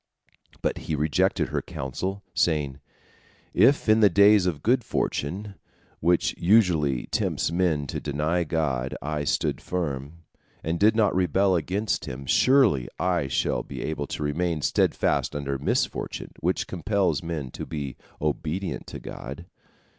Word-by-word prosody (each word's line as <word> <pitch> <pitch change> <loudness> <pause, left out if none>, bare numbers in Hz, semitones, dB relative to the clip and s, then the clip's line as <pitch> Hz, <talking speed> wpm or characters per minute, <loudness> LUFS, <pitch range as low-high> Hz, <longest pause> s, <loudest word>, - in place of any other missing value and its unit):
But - - 0
he 80 - +1
rejected 75 +1 +1
her - - -1
counsel, 95 +10 -4
saying, 75 -6 0 0.7
"If 125 +9 +4
in 110 +1 +5
the 105 -2 +6
days 100 +1 +5
of 80 -5 -2
good 120 +2 +3
fortune, 100 +7 -2 0.5
which 85 +1 +2
usually 85 - +3
tempts - - 0
men 85 -5 +1
to - - -4
deny 75 +5 0
God, 75 -6 -1
I 75 0 -3
stood - - 0
firm, 80 -2 -4 0.4
and 85 +1 -1
did 110 +2 +5
not 110 -3 +3
rebel 95 +2 +3
against 95 +5 -1
Him, 70 +2 -7
surely 115 - +4
I 90 -6 0
shall - - 0
be - - -7
able 75 -2 -3
to - - -4
remain 80 +1 -1
steadfast - - +1
under 70 -1 -2
misfortune, 70 - -2
which 90 +3 0
compels 90 -3 0
men 80 -6 -4
to - - -7
be 70 -5 -5 0.2
obedient 75 +5 -2
to - - -7
God." 70 +7 -8
85 Hz, 140 wpm, -26 LUFS, 75-95 Hz, 0.7 s, the